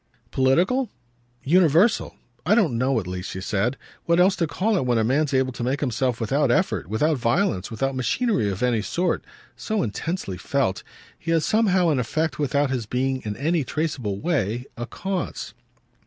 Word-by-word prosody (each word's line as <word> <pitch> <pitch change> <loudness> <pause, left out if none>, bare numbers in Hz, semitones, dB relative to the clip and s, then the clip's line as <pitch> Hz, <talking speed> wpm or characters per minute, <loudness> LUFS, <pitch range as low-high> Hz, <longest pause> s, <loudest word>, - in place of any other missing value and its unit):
"Political?" 180 - +2 0.5
"Universal. 175 - +3 0.3
I 195 +7 +3
don't 180 - +2
know 130 +1 +1
at 100 - -6
least," 90 0 -5
she 95 - -5
said, 105 +7 -1 0.3
"what 170 +1 +3
else 185 +2 +5
to 165 - +1
call 200 +9 0
it 185 - +1
when 120 -1 +2
a 110 - +2
man's 140 +6 +1
able 130 -1 +1
to 120 - -6
make 130 +4 0
himself 125 -2 -1
without 135 +5 +1
effort, 120 - +1
without 145 +7 +1
violence, 120 - +1
without 135 +4 -2
machinery 130 - 0
of 95 +3 -3
any 120 -3 +2
sort, 180 - -1 0.3
so 215 -4 -1
intensely 110 - -3
felt. 95 +2 -1 0.4
He 170 - -7
has 165 -2 +2
somehow 190 -6 +3
an 145 -4 +2
effect 155 +7 -1
without 145 -1 +1
his 120 -5 -2
being 130 +2 -1
in 105 -1 -4
any 160 +2 +1
traceable 130 -8 -2
way 125 - -1
a 120 +1 -5
cause." 190 +3 -4
135 Hz, 175 wpm, -24 LUFS, 120-170 Hz, 0.5 s, else